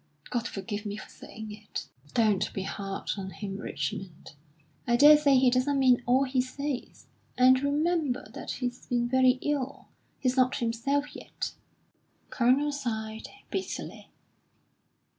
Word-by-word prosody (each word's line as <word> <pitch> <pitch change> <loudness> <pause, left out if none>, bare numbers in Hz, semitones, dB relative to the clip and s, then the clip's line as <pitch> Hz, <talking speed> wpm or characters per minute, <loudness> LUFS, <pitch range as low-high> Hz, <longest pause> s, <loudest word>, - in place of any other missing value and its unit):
God 240 -1 -1
forgive 205 +1 -5
me 205 0 -4
for - - -10
saying 220 -1 -10
it!" 210 -6 -7 0.3
"Don't 215 -4 +2
be 195 - -2
hard 195 0 -4
on 190 -1 -5
him, 195 0 -6
Richmond. 195 -6 -5 0.6
I 240 - +4
daresay 295 +1 +7
he 255 -1 +5
doesn't 260 +3 +2
mean 255 -2 +4
all 255 +2 +4
he 260 -1 +1
says. 265 +1 -5 0.3
And 255 +1 +6
remember 295 -1 0
that - - -8
he's 245 -1 -4
been 240 -1 +1
very 260 0 +4
ill. 280 -2 -2 0.3
He's 255 -1 0
not 255 0 +4
himself 260 +5 -1
yet." - - -5 0.7
The - - -35
Colonel 265 +4 +3
sighed 220 -5 -4 0.2
bitterly. 380 - -5
250 Hz, 140 wpm, -28 LUFS, 220-275 Hz, 0.7 s, daresay